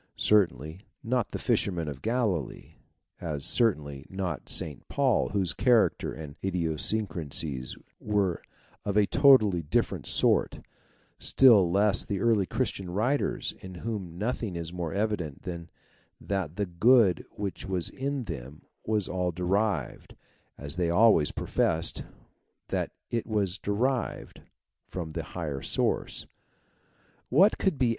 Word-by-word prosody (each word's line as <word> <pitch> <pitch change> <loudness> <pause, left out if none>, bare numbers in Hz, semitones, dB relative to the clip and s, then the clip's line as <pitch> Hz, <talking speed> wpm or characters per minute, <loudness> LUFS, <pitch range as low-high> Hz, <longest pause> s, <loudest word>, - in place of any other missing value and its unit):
Certainly 80 - +2 0.2
not 120 -1 0
the - - -4
fishermen 85 -5 0
of 70 -2 -6
Galilee; 110 - -2 0.5
as 75 -5 -4
certainly 75 - 0
not 95 -2 -4
St. 75 -4 -4
Paul, 135 -5 +1
whose 95 -6 0
character 120 +1 +2
and 75 -3 -8
idiosyncrasies 80 -6 -2 0.2
were 100 -5 0 0.4
of 100 0 -1
a 105 - +5
totally 110 - +5
different 75 - -1
sort; - - +2 0.6
still 110 -9 +6
less 100 +3 +3
the 100 -3 -3
early 110 -4 +2
Christian 95 -2 -2
writers 115 +10 0
in 95 -1 -10
whom 95 -4 -5
nothing 110 -2 -2
is 85 0 -5
more 85 -3 -3
evident 100 -8 -2
than 85 -3 -6 0.5
that 95 -5 -3
the 105 - -1
good 95 0 +4
which 100 -1 -5
was 95 -3 0
in 140 0 -3
them 75 - -8 0.2
was 105 -3 0
all 90 -1 -1
derived, 90 - -1 0.4
as 70 +3 -6
they 85 -2 +1
always 85 -5 +5
professed - - -1 0.7
that - - -1 0.2
it 115 -1 -2
was 100 -3 0
derived, 120 +6 -2 0.5
from 85 -4 -5
the 80 - -3 0.2
higher 75 -5 -3
source. - - -1 1.0
"What 185 - +5
could 190 -7 +1
be 125 -3 +2
95 Hz, 125 wpm, -28 LUFS, 85-110 Hz, 1.0 s, still